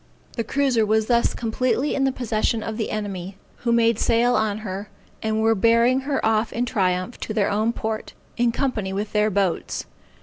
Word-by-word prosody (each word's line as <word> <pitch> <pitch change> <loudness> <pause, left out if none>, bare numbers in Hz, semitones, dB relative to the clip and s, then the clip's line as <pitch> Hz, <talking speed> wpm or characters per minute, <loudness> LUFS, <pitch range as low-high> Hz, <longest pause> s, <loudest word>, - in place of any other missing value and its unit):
The 230 - -1
cruiser 260 -1 +1
was 215 +1 +2
thus 235 0 +2
completely 255 +4 0
in 270 - +1
the 270 - +2
possession 225 -3 -1
of 220 -1 -4
the 220 - -2
enemy, 195 -3 -4 0.2
who 240 - -1
made 230 -1 +3
sail 235 +1 +3
on 215 -3 +1
her, 195 +1 -5 0.3
and 220 0 0
were 225 0 +4
bearing 230 +4 +4
her 275 -2 -1
off 220 0 +2
in 240 +2 -1
triumph 185 -1 -1
to 215 - -5
their 210 -3 +2
own 215 +3 +1
port, 220 -1 -4 0.2
in 240 -1 +2
company 225 -7 -2
with 205 +2 -3
their 210 0 +2
boats. 195 -3 -1
220 Hz, 190 wpm, -23 LUFS, 210-240 Hz, 0.3 s, were